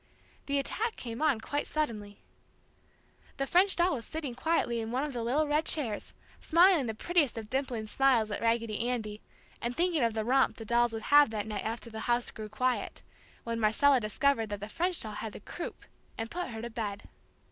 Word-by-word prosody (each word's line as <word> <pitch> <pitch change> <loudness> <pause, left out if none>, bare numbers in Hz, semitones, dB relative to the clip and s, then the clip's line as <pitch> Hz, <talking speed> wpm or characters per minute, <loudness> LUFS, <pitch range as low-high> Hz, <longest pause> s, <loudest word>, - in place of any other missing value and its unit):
The 280 0 +1
attack 435 - -1
came 230 +1 -6
on 295 -7 +3
quite 290 +5 -2
suddenly. 215 -9 -3 1.1
The 275 - 0
French 370 +6 +4
doll 355 +1 +3
was 235 - -4
sitting 300 -1 -5
quietly 250 -3 0
in 220 - -4
one 255 +4 0
of 295 -2 -3
the 240 - -3
little 265 +7 +1
red 300 +2 +2
chairs, 240 -10 -2 0.2
smiling 340 -4 +5
the 220 - -3
prettiest 310 -2 +1
of 220 -1 -7
dimpling 255 -4 -1
smiles 235 -2 +3
at - - -3
Raggedy 230 0 0
Andy, 215 -4 -3 0.4
and 240 +2 -3
thinking 340 -5 +2
of 230 -1 +1
the 220 -1 -1
romp 265 +3 +3
the 225 - -7
dolls 235 +1 +3
would 225 -1 -5
have 290 -3 +8
that 215 -2 -3
night 210 -2 -4
after 230 +1 -4
the 220 - -6
house 240 0 +1
grew 215 -1 -7
quiet, 250 +4 -1 0.4
when 230 0 -3
Marcella 255 +6 +4
discovered 225 +1 +1
that 205 -1 -4
the 205 - -6
French 355 +7 0
doll 215 - -5
had 210 0 -5
the - - -8
"croup" 335 - -7 0.3
and 225 0 -4
put 355 +1 -3
her 225 -1 -6
to 235 - -5
bed. 210 -3 -4
240 Hz, 200 wpm, -30 LUFS, 220-290 Hz, 1.1 s, have